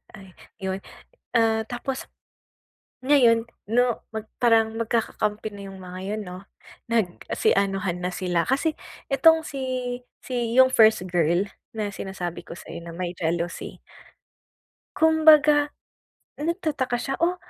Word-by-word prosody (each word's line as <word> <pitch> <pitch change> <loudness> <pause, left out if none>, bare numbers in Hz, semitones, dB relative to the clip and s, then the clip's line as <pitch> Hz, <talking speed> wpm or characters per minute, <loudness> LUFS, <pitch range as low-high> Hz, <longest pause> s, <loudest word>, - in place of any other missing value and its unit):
Ay, 190 -1 -13 0.3
yun, 190 0 -3 0.6
ah, 225 -1 +3
tapos 255 +2 -4 1.0
ngayon 240 -5 +5 0.2
'no, 245 +1 +2
mag 220 -1 -3 0.2
parang 225 -2 +4
magkakakampi 220 -2 -1
na 200 -1 -8
yung 195 -1 -10
mga 180 0 -8 0.2
yun - - -4
'no, 180 -1 -8 0.5
nagsi 220 -7 0
anuhan 195 -2 0
na 180 - -1
sila 175 -3 0
kasi 280 +5 +1 0.4
itong 320 +4 +6
si, 275 -2 -6 0.6
si 240 -2 -2
yung 260 0 +7
first 220 -5 +5
girl 175 +1 +2 0.3
na 210 -2 -2
sinasabi 190 -3 -5
ko - - -8
sa'yo - - -9
na 170 -1 -8
may 180 -1 -3
jealousy 170 +1 -3 1.2
kumbaga 305 -2 +6 0.7
nagtataka 305 -6 -1
siya, 270 +3 -3
"Oh, 345 +2 +2
225 Hz, 125 wpm, -25 LUFS, 190-265 Hz, 1.2 s, yung